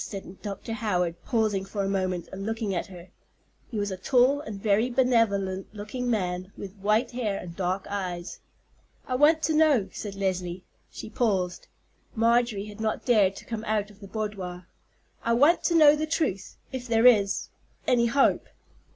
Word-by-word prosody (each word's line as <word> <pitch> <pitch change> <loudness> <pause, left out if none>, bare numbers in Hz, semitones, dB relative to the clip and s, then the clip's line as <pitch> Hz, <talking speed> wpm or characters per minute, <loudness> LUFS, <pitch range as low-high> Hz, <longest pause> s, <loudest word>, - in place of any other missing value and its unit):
said 195 -2 -8
Dr. 205 +2 -5
Howard, 180 -6 -1
pausing 215 -5 +1
for 200 +1 -3
a - - -1
moment 185 -3 -1
and 195 +1 -6
looking 220 -1 -2
at 175 - -2
her. 180 -2 -12 0.6
He 230 - -5
was 205 -1 -1
a 190 - -4
tall 255 +7 +3
and 215 -7 -7
very 215 +3 +2
benevolent 220 -7 +1
looking 245 +4 -4
man, 185 -4 -2
with 195 0 -8
white 210 +4 +1
hair 225 -5 -2
and 170 -2 -8
dark 185 +1 -2
eyes. 185 -3 -4 0.7
"I 255 - -2
want 305 +4 +4
to 315 - +1
know," 305 -9 +3
said 205 -2 -6
Leslie—she 185 0 -5
paused. 185 -7 -1 0.5
Marjorie 230 -2 +2
had 210 +1 -10
not 220 -1 -2
dared 205 -6 +4
to - - -11
come 225 -2 -5
out 210 -1 -1
of 205 - -19
the 200 - -10
boudoir. 195 -4 -5 0.6
"I 230 - +1
want 290 +9 +4
to 340 - +2
know 300 -2 +7
the 310 +1 -2
truth—if 260 - -3
there 225 0 +3
is—any 235 +2 +2
hope?" 275 +4 +2
210 Hz, 165 wpm, -27 LUFS, 190-240 Hz, 0.7 s, know